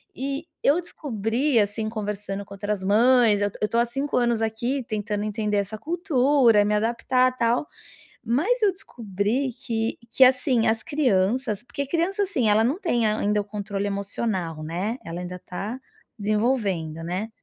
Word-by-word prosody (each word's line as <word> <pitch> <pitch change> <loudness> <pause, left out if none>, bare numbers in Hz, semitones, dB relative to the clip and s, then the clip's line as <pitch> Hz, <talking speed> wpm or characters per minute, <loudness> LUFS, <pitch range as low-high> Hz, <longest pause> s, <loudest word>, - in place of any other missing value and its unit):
e 275 +3 -3 0.2
eu 320 +6 +4
descobri, 245 - -1
assim, 210 +2 0
conversando 205 -2 -4
com 200 - -12
outras 205 -1 -3
mães 220 +1 +4
eu 205 0 +1
eu 210 - +2
tô 230 - 0
há 235 - +4
5 270 +4 -2
anos 235 -2 +2
aqui 235 +5 -1
tentando 210 -2 -2
entender 210 -1 -1
essa 205 +2 -2
cultura, 275 - +3
me 210 - +1
adaptar, 255 +3 +1
tal. 235 +5 +1 0.6
Mas 355 - +1
eu 400 - +4
descobri 230 - -2 0.2
que 225 -2 -1
que, 265 - +1
assim, 255 -2 +3
as 225 0 +1
crianças 240 -6 +1
porque 280 +2 -4
criança, 350 +7 0
assim, 265 - 0
ela 215 +2 +4
não 270 +9 0
tem 240 - +1
ainda 210 -1 +1
o - - -4
controle 200 -1 -4
emocional, 195 -5 -3
né, 185 +9 -2
ela 165 +1 -5
ainda 180 0 -6
tá 205 +7 -5 0.4
desenvolvendo, 205 -7 0
né. 185 +6 -3
225 Hz, 160 wpm, -24 LUFS, 205-255 Hz, 0.6 s, eu